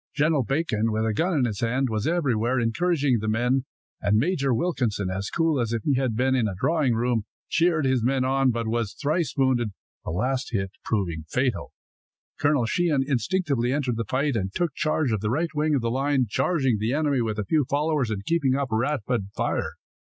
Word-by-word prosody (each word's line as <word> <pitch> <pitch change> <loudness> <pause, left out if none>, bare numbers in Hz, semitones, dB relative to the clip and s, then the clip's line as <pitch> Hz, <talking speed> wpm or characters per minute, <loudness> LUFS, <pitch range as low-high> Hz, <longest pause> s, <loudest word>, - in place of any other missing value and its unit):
General 150 0 +2
Bacon, 125 -5 0
with 110 +1 0
a 110 - 0
gun 170 - +1
in 130 - +3
his 105 -4 -3
hands, 125 +4 +1
was 110 -1 -1
everywhere, 130 -7 +1
encouraging 135 +1 +1
the 110 - -4
men. 125 +4 +1 0.4
Major 135 - +1
Wilkinson, 115 - 0
as 95 +2 -3
cool 165 -4 +1
as 115 -1 -1
if 115 -3 -2
he 145 - +2
had 130 -4 0
been 130 +3 +2
in 125 -4 +2
a 95 - -4
drawing 150 -5 +2
room, 115 -2 0 0.2
cheered 165 -3 +2
his 130 -2 +2
men 130 +1 +1
on, 135 0 +2
but 115 -1 -1
was 115 -2 -1
thrice 155 +3 -1
wounded, 125 -6 +1 0.3
the - - -5
last 125 +8 -1
hit 95 -3 -1
proving 85 -7 -2
fatal. 130 -1 -1 0.7
Colonel 145 -4 +2
Sheehan 150 +2 +1
instinctively 140 -3 0
entered 135 -4 0
the 115 0 -2
fight, 135 +4 0
and 95 -3 -1
took 170 - -1
charge 155 -4 0
of 110 - 0
the 105 +2 -2
right 160 +8 -1
wing 150 0 +1
of 135 - +1
the 115 0 -1
line, 135 0 +1
charging 135 - +1
the 110 +4 0
enemy 145 -3 +1
with 110 -2 -2
a 105 - -2
few 155 +4 +2
followers 145 -3 +1
and 100 -2 -4
keeping 140 -6 +2
up 135 -3 -2
a - - +1
rapid 125 -4 -1
fire. - - -1
130 Hz, 205 wpm, -25 LUFS, 115-145 Hz, 0.7 s, in